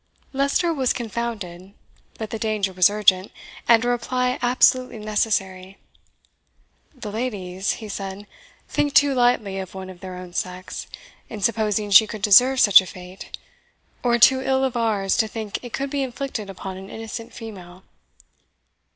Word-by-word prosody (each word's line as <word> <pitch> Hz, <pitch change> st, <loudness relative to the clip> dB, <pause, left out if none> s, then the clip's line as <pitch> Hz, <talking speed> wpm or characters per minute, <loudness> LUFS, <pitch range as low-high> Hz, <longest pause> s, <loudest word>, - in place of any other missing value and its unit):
Leicester 280 Hz, +5 st, +1 dB
was 265 Hz, -5 st, +1 dB
confounded, 210 Hz, -6 st, -5 dB, 0.4 s
but 220 Hz, -1 st, -6 dB
the 225 Hz, -, -4 dB
danger 215 Hz, -3 st, -1 dB
was 180 Hz, 0 st, +5 dB
urgent, 200 Hz, -2 st, +2 dB, 0.4 s
and 230 Hz, 0 st, +5 dB
a -, -, 0 dB
reply 250 Hz, +1 st, -1 dB
absolutely 250 Hz, 0 st, +3 dB
necessary. 195 Hz, -3 st, -2 dB, 1.2 s
"The 225 Hz, -5 st, -7 dB
ladies," 200 Hz, -5 st, -3 dB
he 220 Hz, -, -8 dB
said, 195 Hz, 0 st, -6 dB, 0.4 s
"think 290 Hz, -1 st, -1 dB
too 285 Hz, -1 st, +5 dB
lightly 240 Hz, -6 st, +1 dB
of 190 Hz, 0 st, -8 dB
one 190 Hz, 0 st, -7 dB
of 180 Hz, -, -14 dB
their 185 Hz, 0 st, -8 dB
own 180 Hz, -1 st, -10 dB
sex, 180 Hz, 0 st, -5 dB, 0.4 s
in 210 Hz, -, -7 dB
supposing 210 Hz, -1 st, 0 dB
she 215 Hz, +3 st, +8 dB
could 210 Hz, -2 st, -8 dB
deserve 250 Hz, +6 st, +6 dB
such 200 Hz, -5 st, +8 dB
a 190 Hz, -, -10 dB
fate; 180 Hz, +1 st, -10 dB, 0.6 s
or 240 Hz, -1 st, +2 dB
too 260 Hz, +3 st, +6 dB
ill 265 Hz, 0 st, +1 dB
of 260 Hz, -2 st, -1 dB
ours, 215 Hz, -5 st, 0 dB
to 220 Hz, -, +2 dB
think 215 Hz, -2 st, -5 dB
it 245 Hz, -, -8 dB
could 275 Hz, +3 st, -3 dB
be 285 Hz, -1 st, -1 dB
inflicted 260 Hz, -5 st, -4 dB
upon 190 Hz, 0 st, -7 dB
an 190 Hz, +1 st, -10 dB
innocent 225 Hz, +1 st, -7 dB
female." 185 Hz, -5 st, -11 dB
215 Hz, 155 wpm, -22 LUFS, 190-245 Hz, 1.2 s, she